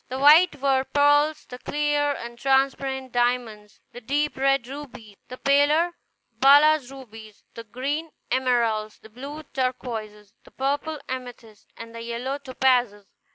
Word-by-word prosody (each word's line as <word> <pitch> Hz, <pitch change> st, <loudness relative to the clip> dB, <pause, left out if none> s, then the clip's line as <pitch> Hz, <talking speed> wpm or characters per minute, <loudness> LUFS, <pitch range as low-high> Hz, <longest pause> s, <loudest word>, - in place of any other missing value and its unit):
The 260 Hz, -, -4 dB
white 300 Hz, +5 st, +6 dB
were 265 Hz, -1 st, +2 dB
pearls; 290 Hz, +2 st, +2 dB
the 250 Hz, 0 st, -10 dB
clear 290 Hz, 0 st, 0 dB
and 235 Hz, -3 st, -8 dB
transparent, 265 Hz, -1 st, 0 dB
diamonds; 240 Hz, -4 st, -2 dB
the 245 Hz, -, -11 dB
deep 290 Hz, +5 st, -1 dB
red, 275 Hz, -1 st, +1 dB
rubies; 250 Hz, -6 st, -10 dB
the 255 Hz, -, -9 dB
paler, 290 Hz, +5 st, +3 dB, 0.5 s
balas 290 Hz, 0 st, +5 dB
rubies; 225 Hz, -5 st, -13 dB
the 230 Hz, -, -9 dB
green, 280 Hz, +8 st, -4 dB, 0.2 s
emeralds; 235 Hz, -4 st, 0 dB
the 220 Hz, -, -17 dB
blue, 280 Hz, +7 st, -9 dB
turquoises; 225 Hz, -5 st, -4 dB
the -, -, -18 dB
purple, 285 Hz, +3 st, -3 dB
amethysts; 245 Hz, -4 st, -8 dB
and 230 Hz, 0 st, -10 dB
the 230 Hz, -, -8 dB
yellow, 240 Hz, +4 st, -4 dB
topazes. 250 Hz, -6 st, 0 dB
260 Hz, 135 wpm, -24 LUFS, 235-285 Hz, 0.5 s, white